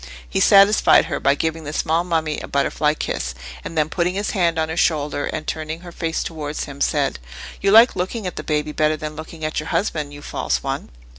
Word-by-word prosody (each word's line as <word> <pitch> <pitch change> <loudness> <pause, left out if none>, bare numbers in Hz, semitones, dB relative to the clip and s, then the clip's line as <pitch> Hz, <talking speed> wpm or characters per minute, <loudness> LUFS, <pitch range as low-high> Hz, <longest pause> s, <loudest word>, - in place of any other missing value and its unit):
He - - -1
satisfied 200 +1 +6
her - - -3
by 140 - +3
giving 160 +2 -2
the 150 0 -6
small 160 +2 +1
mummy 160 -3 -1
a - - -7
butterfly 150 +2 +1
kiss, 60 - -3 0.3
and 165 - -7
then 155 -1 +3
putting 180 +3 -1
his 205 +1 -1
hand 170 -5 +1
on 160 0 +1
her 160 - -4
shoulder 150 -4 +1
and 155 - -4
turning 160 +1 -4
her 175 -1 -10
face 165 -1 -2
towards 150 -2 -4
him, 140 -1 -9
said, 145 -3 +1 0.4
"You 195 - +2
like 225 +4 +7
looking 195 +4 -3
at 180 - -4
the - - -4
baby 150 0 -1
better 155 0 +1
than 155 0 -6
looking 160 0 -7
at 155 - -1
your 155 +1 -6
husband, 155 -7 -1
you 145 0 -11
false - - -2
one!" - - -3
155 Hz, 220 wpm, -21 LUFS, 150-170 Hz, 0.4 s, like